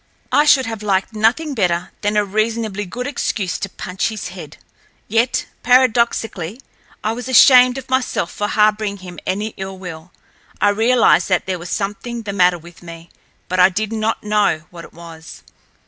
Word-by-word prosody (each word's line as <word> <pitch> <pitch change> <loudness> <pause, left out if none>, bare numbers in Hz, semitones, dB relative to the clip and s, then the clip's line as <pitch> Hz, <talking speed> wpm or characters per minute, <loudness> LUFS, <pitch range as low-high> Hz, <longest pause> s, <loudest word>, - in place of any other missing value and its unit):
I 295 - +4
should 275 -3 +5
have 225 -2 -5
liked 195 0 -1
nothing 235 +8 +1
better 180 -7 -1
than 205 0 0
a 210 - +2
reasonably 215 0 -2
good 250 +7 -5
excuse 205 - -2
to 195 - -4
punch 185 0 -3
his 220 -2 -5
head; - - -10 0.5
yet, 235 +3 +1 0.2
paradoxically, 235 -5 +1 0.4
I 215 - 0
was 245 +3 -6
ashamed 255 0 +7
of 265 - -8
myself 260 -9 -1
for 205 - -3
harboring 210 -1 +1
him 175 -3 -9
any 205 +3 -1
ill 190 0 -6
will. 180 -2 -9 0.5
I 205 - +4
realized 225 +3 +3
that 185 -2 +1
there 185 -2 -3
was 175 +1 -8
something 220 +5 -4
the 200 -2 -5
matter 180 -2 +3
with 170 +1 -15
me, 165 -1 -11 0.4
but 185 +1 -2
I 180 +1 +7
did 215 +4 -3
not 220 0 -2
know 210 -7 +1
what 170 -1 -10
it - - -17
was. 165 -1 -12
210 Hz, 175 wpm, -18 LUFS, 185-230 Hz, 0.5 s, ashamed